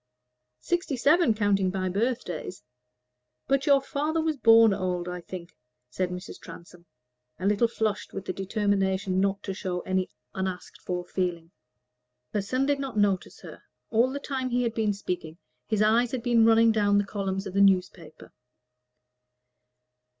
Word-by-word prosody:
"Sixty 345 -6 -1
seven, 290 -1 +4
counting 200 -3 +2
by 185 0 -2
birthdays; 195 - -3 0.8
but 275 +1 +1
your 280 -1 +6
father 300 +4 -2
was 315 -1 0
born 225 -3 +6
old, 180 -2 -2
I 180 0 -5
think," 175 0 -9 0.4
said 185 +7 -1
Mrs. 180 +1 -8
Transome, 170 0 -13 0.5
a 185 - -5
little 210 +3 +3
flushed 215 -2 -2
with 195 0 -6
the 185 - -3
determination 195 -1 0
not 195 +1 0
to 195 - -4
show 185 -2 -4
any 185 0 -1 0.2
unasked 190 -1 -5
for 180 -1 -4
feeling. 175 -2 -3 0.8
Her 210 - +1
son 255 +7 -1
did 285 0 +1
not 270 -5 -5
notice 200 -3 0
her. - - -11 0.3
All 230 +3 +3
the 280 +2 -4
time 265 -2 -3
he 245 0 +1
had 230 -2 -1
been 220 -2 0
speaking 180 -5 -5 0.3
his 215 -1 +1
eyes 230 +3 +3
had 250 -3 -3
been 235 -2 +4
running 225 0 +5
down 205 -2 +2
the 205 - +2
columns 195 -1 -3
of 190 - -6
the 200 - +2
newspaper. 180 -5 0
205 Hz, 155 wpm, -27 LUFS, 185-235 Hz, 0.8 s, your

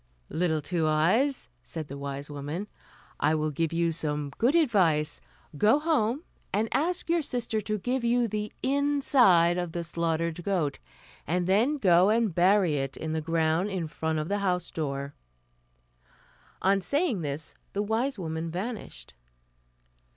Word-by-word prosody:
"Little 160 -3 0
Two 165 -1 0
Eyes," 190 - +2
said 160 -3 -6
the 140 - -7
wise 140 0 -5
woman, 145 +6 -5 0.5
"I 155 +2 +3
will 155 0 -1
give 160 +2 -1
you 170 0 +1
some 150 -3 -2
good 255 +7 +3
advice. 185 - +2 0.3
Go 215 - +4
home, 295 -3 0 0.3
and 215 +3 +1
ask 350 +5 0
your 335 0 +2
sister 240 -5 -2
to 215 +1 -2
give 250 +5 -2
you 235 0 +2
the 210 0 -3
inside 260 -11 +4
of 175 -2 -4
the 170 - -2
slaughtered 165 0 -2
goat, 170 -8 -1 0.5
and 175 +3 0
then 225 +11 +2
go 185 -5 +5
and 220 -3 +2
bury 180 -2 +3
it 135 -1 -3
in 160 0 -4
the 160 - -1
ground 165 +3 +1
in 185 -4 -2
front 160 0 -2
of 155 0 -2
the 205 +2 -1
house 180 -3 -1
door." 140 -2 -3 1.5
On 195 +2 +3
saying 280 - +1
this 145 0 -5 0.2
the 205 - 0
wise 225 +6 -1
woman 160 -2 -4
vanished. 185 - -6
180 Hz, 150 wpm, -28 LUFS, 160-225 Hz, 1.5 s, go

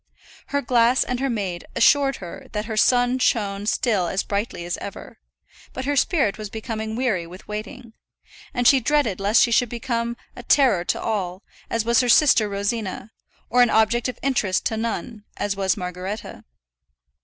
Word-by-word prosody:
Her 285 0 -1
glass 240 +1 +3
and 250 -1 -3
her 270 +1 0
maid 195 -7 -3
assured 275 -1 +4
her 175 -3 -9
that 210 0 -2
her 220 0 -4
sun 245 +3 +3
shone 205 -4 0
still 210 -6 +1
as 190 +3 -1
brightly 200 -4 -3
as 175 - -3
ever; - - -9 0.5
but 260 - -5
her 290 +1 0
spirit 270 - +1
was 210 -1 -6
becoming 220 0 -5
weary 220 -9 -1
with 180 +3 -13
waiting, 220 +3 -7 0.6
and 245 -3 +1
she 270 - +6
dreaded 255 -6 +1
lest 205 +5 +4
she 240 - +1
should 240 +1 +3
become 235 -1 -3 0.2
a - - -8
terror 245 -7 +3
to - - -1
all, 190 -4 -3 0.3
as 230 -1 -1
was 235 0 +3
her 250 -1 +1
sister 240 -5 +5
Rosina, 200 +1 -3 0.4
or 245 +2 +3
an 245 - +5
object 220 +2 +2
of 255 - -5
interest 230 -9 0
to 220 - 0
none, 225 0 -4
as 205 -1 -2
was 195 0 0
Margaretta. 185 +3 -6
225 Hz, 175 wpm, -23 LUFS, 200-245 Hz, 0.6 s, she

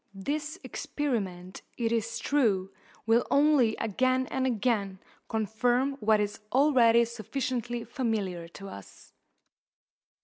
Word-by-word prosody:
This 295 - -3
experiment, 190 -11 -3 0.2
it 230 -2 0
is 230 0 -1
true, 215 -8 +1 0.3
will 230 +2 +4
only 280 -6 +4
again 255 +4 +1
and 260 0 0
again 210 -5 0 0.3
confirm 235 +5 +1
what 215 0 +3
is 205 0 -2
already 245 -4 +5
sufficiently 240 +1 -3
familiar 205 - -2
to 195 +3 -10
us. 100 - -12
230 Hz, 105 wpm, -28 LUFS, 205-260 Hz, 0.3 s, already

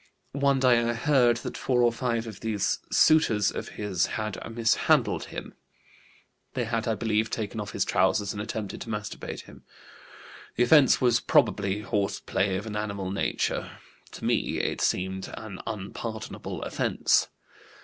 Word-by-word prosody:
One 140 -1 +2
day 125 -2 +5
I 120 0 0
heard 125 -1 +3
that - - -4
four 125 -2 +1
or 120 -1 +4
five 115 -2 -1
of 110 -4 -8
these 110 -3 -1
suitors 115 -11 +4
of - - -5
his 100 -5 0
had 110 -2 -3 0.2
mishandled 115 0 +2
him; - - -8 1.0
they 125 - 0
had, 115 -1 -2
I 110 - +1
believe, 110 +1 0
taken 110 -1 -3
off 105 -1 -5
his 100 - 0
trousers 95 +2 +1
and 100 - -4
attempted 110 -1 -5
to - - -7
masturbate 105 -1 -5
him. - - -15 0.9
The 120 - +3
offense 145 +1 +6
was 120 -2 +4
probably 100 -2 +2
horse 100 -1 -1
play 95 -1 0
of 105 - -5
an 110 -2 -5
animal 100 -3 -3
nature; 100 - -1 0.4
to - - -7
me - - +1
it - - -1
seemed 95 +1 -1
an 105 -4 -8
unpardonable 110 +2 -5
offense. - - +1
110 Hz, 155 wpm, -27 LUFS, 100-120 Hz, 1.0 s, offense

